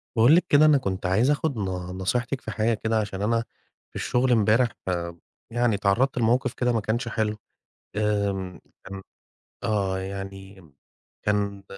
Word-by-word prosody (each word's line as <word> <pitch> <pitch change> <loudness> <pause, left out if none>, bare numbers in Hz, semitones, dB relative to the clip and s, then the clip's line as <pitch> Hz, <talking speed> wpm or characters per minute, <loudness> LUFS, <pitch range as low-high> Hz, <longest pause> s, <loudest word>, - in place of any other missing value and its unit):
باقول 120 +7 +6
لِك 180 +1 +3
كده 150 +1 +6
أنا 150 -2 +6
كنت 95 -8 -3
عايز 110 +10 +3
أخد 145 -3 -1
ن 105 - -2 0.3
نصيحتِك 125 +7 -1
في - - -6
حاجة 115 +2 +1
كده 110 0 0
عشان 100 -2 -4
أنا 115 +2 +1 0.5
في - - -14
الشغل 125 +1 +1
امبارح 115 +2 +4 0.2
آمم 85 -2 -3 0.3
يعني 120 -1 +2
اتعرّضت 105 +7 +1
لموقِف 120 +2 +2
كده 125 -1 +1
ما 115 - +1
كانش 115 +4 -2
حلو. 110 -1 -1 0.6
آمم، 100 -3 -1 0.2
كان 95 0 -8 0.6
آه، 95 -3 0
يعني 95 -2 -8 0.5
كان 100 -1 0
110 Hz, 155 wpm, -25 LUFS, 95-120 Hz, 0.6 s, باقول